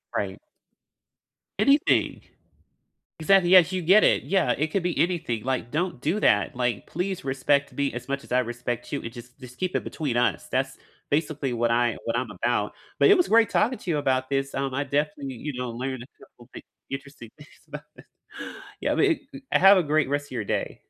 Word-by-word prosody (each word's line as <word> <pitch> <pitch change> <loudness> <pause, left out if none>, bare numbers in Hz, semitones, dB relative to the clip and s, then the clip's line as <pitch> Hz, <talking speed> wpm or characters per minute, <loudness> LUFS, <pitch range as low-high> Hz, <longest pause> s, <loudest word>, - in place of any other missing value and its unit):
Right. - - -3 1.2
Anything. 280 +2 +3 1.0
Exactly, 185 +1 +4
yes, 185 -1 +7
you 185 -1 -2
get 190 +6 +5
it, - - +3
yeah, 185 -10 +1
it 150 +5 0
could 180 +3 -2
be 180 - -1
anything, 165 - 0
like, 130 -3 -2
"Don't 165 -4 -2
do 170 +9 0
that." 105 - +2
Like, 120 -3 -1
"Please 185 0 -3
respect 140 +1 +1
me 140 -3 -2
as 125 +2 -7
much 140 0 -2
as - - -19
I 125 - +4
respect 120 0 -4
you, 145 - -2
and 115 - -7
just 125 +2 -13
just 125 -1 -12
keep 185 0 -2
it - - 0
between 140 -7 -3
us." 120 - 0
That's, - - -1 0.3
basically, 145 -3 -1
what 115 0 0
I 120 0 +2
what 115 0 -1
I'm 120 -3 -3
about, 105 +1 -1 0.3
but - - +6
it 405 - +8
was 360 - +2
great 225 +1 +5
talking 250 +1 +1
to 185 - -8
you 150 - +1
about 130 -1 0
this, 135 0 -1
um, 135 -1 -2
I 140 +2 -1
definitely, 140 -1 -2
you 150 +5 -6
know, 125 -1 -4
learned 130 +1 -4
a 125 - -15 0.2
couple 120 +1 -20
thin - - -9 0.3
interesting 135 -4 -8
things 150 +1 -15 0.2
about - - -8
this. - - -16 0.8
Yeah, - - 0
but 405 - +3
it 310 -6 -1
g 275 0 -10
have 195 +1 +7
a 180 - +3
great 150 -2 +1
rest 145 0 -1
of - - -23
your 115 -4 -3
day. - - -3
140 Hz, 210 wpm, -25 LUFS, 125-175 Hz, 1.2 s, it